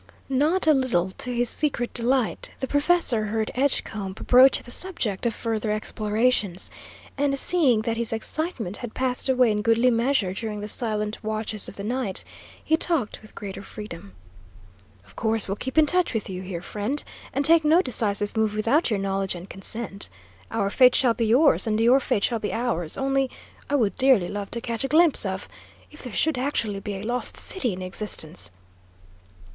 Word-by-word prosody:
Not 300 +8 +2
a 310 - +6
little 235 -10 +1
to 250 - -3
his 245 0 0
secret 245 -3 -1
delight, 245 0 0
the 265 - -2
professor 285 -6 +2
heard 220 +1 -2
Edgecombe 220 -7 -1
broach 255 +6 +5
the 240 - -10
subject 240 - 0
of 230 - -2
further 225 -2 -2
explorations, 215 -2 0 0.5
and 280 -1 +1
seeing 270 -9 +3
that 230 0 -2
his 235 -1 +1
excitement 225 - -2
had 240 -3 -8
passed 255 0 -1
away 250 -3 +4
in 210 0 -1
goodly 230 +3 +3
measure 230 -5 +1
during 210 +1 -5
the 205 - -5
silent 215 -1 -1
watches 215 -1 -3
of - - -12
the 200 - -7
night, 235 -3 -2 0.4
he 320 - +2
talked 320 -9 -1
with 215 - -16
greater 195 -2 -7
freedom. 180 - -10 0.9
"Of - - -20
course 220 -1 +2
we'll 195 - -2
keep 260 +7 -6
in 310 - +7
touch 355 -3 +2
with 210 -3 -3
you, 185 0 -5
here, 180 -2 -6
friend, 215 +10 -3 0.3
and 280 +2 0
take 330 0 +6
no 320 +4 +4
decisive 210 -4 +1
move 220 -1 0
without 230 +10 +2
your 215 - 0
knowledge 195 -1 -1
and 175 +2 -9
consent. 200 +1 -5 0.4
Our 200 -3 -1
fate 250 +1 +5
shall 245 -3 +4
be 230 -1 -1
yours, 260 +2 +4
and 215 0 0
your 240 +4 +5
fate 215 -5 -1
shall 235 -2 +1
be 210 - -3
ours. 225 -9 -1
Only 270 0 0 0.4
I 290 - +1
would 225 -8 +1
dearly 255 -9 +4
love 200 -1 -5
to 235 - -4
catch 230 0 -3
a - - 0
glimpse 310 - +4
of 190 - -4 0.4
If - - -13
there 250 - -7
should 300 +3 0
actually 230 -7 -1
be 200 +1 -5
a 195 - -6
Lost 245 +3 +2
City 275 - +1
in 185 0 -6
existence!" 185 -3 -2
230 Hz, 185 wpm, -24 LUFS, 205-265 Hz, 0.9 s, in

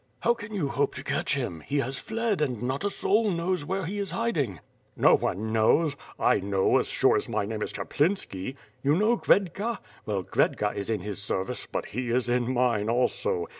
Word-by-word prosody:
"How 235 - +4
can 215 -3 -9
you 190 -9 -1
hope 140 0 0
to 130 - -6
catch 140 - 0
him? 120 - -3
He 140 - -3
has 135 -1 -1
fled, 220 -5 -1
and 125 -6 -1
not 130 +4 -1
a 205 - +1
soul 210 +2 +2
knows 175 -1 0
where 190 +4 -2
he 200 +5 -3
is 200 -2 -2
hiding!" 145 - -1 0.4
"No - - +6
one 110 +4 0
knows? 140 +8 +3 0.2
I - - +4
know 95 0 +2
as - - -1
sure - - +3
as - - -3
my - - 0
name 110 +1 -4
is - - -2
Chap - - -7
linski. 140 - 0 0.3
You 145 +2 +3
know 215 +6 +3
Khvedka. 205 +2 +1 0.3
Well 100 -3 -1
Khvedka - - +1
is 100 +1 -4
in 110 -4 0
his 100 0 -5
ser 95 -1 -1
vice, - - -5
but - - -3
he 125 +2 -4
is 120 0 +1
in 125 0 +1
mine 120 -4 +1
also. 115 -7 +1
135 Hz, 210 wpm, -27 LUFS, -, 0.4 s, No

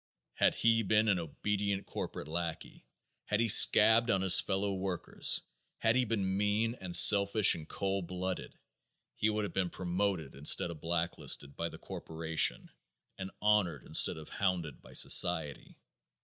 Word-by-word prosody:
Had - - 0
he 115 0 +1
been 110 +1 0
an 95 -3 0
obedient 100 +4 -4
corporation 75 +2 -8
lackey; 85 -1 -7 0.4
had 105 - -2
he 115 - 0
scabbed 110 +2 +5
on 95 - 0
his 95 -1 +7
fellow 100 0 -3
workers; 95 -2 -2 0.4
had 110 +1 0
he 130 0 0
been 100 -4 -3
mean 105 +3 -1
and 90 -2 -4
selfish 100 0 +6
and 80 -1 -9
cold 95 -2 -4
blooded, 90 +1 -7 0.6
he 110 - -1
would 105 0 -3
have 100 - -7
been 95 -2 -2
promoted 90 -4 -4
instead 75 +4 +2
of 80 -3 -12
blacklisted 85 -4 -3
by 85 0 -5
the - - -13
corporation 80 0 -4 0.5
and 95 0 -7
honored 100 -10 0
instead - - +2
of 80 - -12
hounded 90 -7 -4
by - - -17
society. 80 -5 +2
95 Hz, 150 wpm, -30 LUFS, 85-105 Hz, 0.6 s, his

